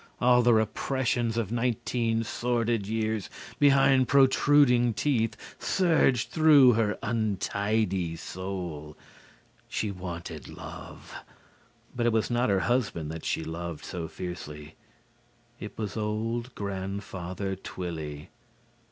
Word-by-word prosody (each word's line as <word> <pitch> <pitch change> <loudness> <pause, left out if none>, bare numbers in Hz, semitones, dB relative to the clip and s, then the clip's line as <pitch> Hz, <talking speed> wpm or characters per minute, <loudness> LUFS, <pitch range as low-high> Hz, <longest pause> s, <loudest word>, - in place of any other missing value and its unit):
All 125 0 +5
the 120 -1 +5
repressions 115 +1 0
of 110 -3 -1
nineteen 115 -1 0
sordid 115 -2 -1
years 110 -1 -1 0.3
behind 135 -2 +5
protruding 130 -3 +4
teeth 115 -4 0 0.2
surged 160 -9 +2
through 150 -6 +7
her 110 -2 +1
untidy 100 -4 0
soul. 85 -3 -6 0.7
She 105 - -2
wanted 85 -4 -7
love. - - -10 0.8
But 120 -1 +1
it 120 - +2
was 110 +1 +1
not 120 -1 +2
her 95 -2 +2
husband 100 -11 -1
that 80 0 -7
she - - -1
loved 85 -1 -6
so 85 -3 -5
fiercely. 75 -4 -7 0.9
It 105 - -8
was 105 -2 -4
old 115 +3 -2
Grandfather 95 -1 -4
Twilly. 80 -4 -6
110 Hz, 110 wpm, -28 LUFS, 90-120 Hz, 0.9 s, through